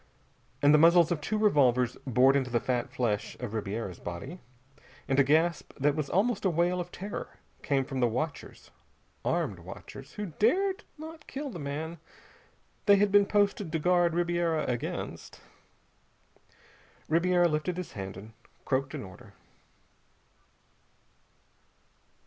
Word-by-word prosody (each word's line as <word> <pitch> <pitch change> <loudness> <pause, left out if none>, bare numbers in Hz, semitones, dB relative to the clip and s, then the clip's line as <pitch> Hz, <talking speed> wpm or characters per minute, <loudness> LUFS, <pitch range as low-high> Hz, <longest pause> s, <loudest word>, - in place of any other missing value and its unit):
And 145 +1 +7
the 150 - +6
muzzles 170 +1 +6
of 160 -3 -1
two 215 +8 -1
revolvers 130 - +3
bored 130 +2 +5
into 135 -2 +1
the 120 -1 +1
fat 125 0 -1
flesh 110 -5 -2
of 120 -4 -5
Ribiera's 105 -3 -4
body, 90 - -7 0.7
and 135 0 +2
a - - +7
gasp 160 +5 +1
that 145 +1 +2
was 155 -3 -2
almost 210 +3 +1
a 190 - +3
wail 175 +2 +1
of 175 0 -5
terror 200 +2 -7 0.2
came 135 -3 0
from 135 -1 -4
the 120 - +4
watchers 145 +7 -5 0.5
armed - - -1
watchers - - -11
who 210 -2 -4
dared 380 - +2
not 320 +1 -10
kill 280 0 -5
the 175 - -7
man 155 +3 -5 0.9
they 200 - +8
had 200 0 +3
been 205 0 +5
posted 205 -4 +1
to 165 - 0
guard 175 +1 +2
Ribiera 170 -2 +1
against. 120 -2 -4 1.7
Ribiera 175 +2 +3
lifted 160 +3 -1
his 180 - -5
hand 95 -2 -6
and 110 +3 -11 0.3
croaked 135 +2 -1
an 135 - -5
order. 95 -2 -13
160 Hz, 140 wpm, -29 LUFS, 130-180 Hz, 1.7 s, they